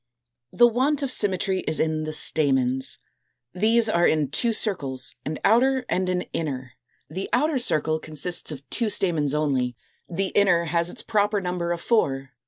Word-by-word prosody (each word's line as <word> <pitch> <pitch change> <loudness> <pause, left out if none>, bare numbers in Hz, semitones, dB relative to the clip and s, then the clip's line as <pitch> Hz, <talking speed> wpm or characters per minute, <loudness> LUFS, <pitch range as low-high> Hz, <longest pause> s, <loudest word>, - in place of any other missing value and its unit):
The 240 - +5
want 270 +5 0
of 270 - -2
symmetry 190 -3 0
is 155 - 0
in 155 -1 0
the 155 - -4
stamens. 135 -4 +2 0.6
These 220 +5 +3
are 175 -5 +3
in 150 -4 0
two 235 +8 +2
circles, 145 - -2
an 155 +1 -3
outer 255 +4 +3
and 185 +1 0
an 180 0 -1
inner. 130 -6 -4 0.3
The 185 +5 -5
outer 290 +2 +1
circle 155 -9 +1
consists 155 +3 -2
of 140 -2 -9
two 230 -3 0
stamens 160 -8 0
only; 130 -5 0 0.3
the 190 +2 -1
inner 185 -4 +3
has 170 +1 0
its - - -5
proper 205 -1 +1
number 180 -2 -3
of 170 -1 -3
four. 135 - 0
175 Hz, 165 wpm, -24 LUFS, 150-215 Hz, 0.6 s, The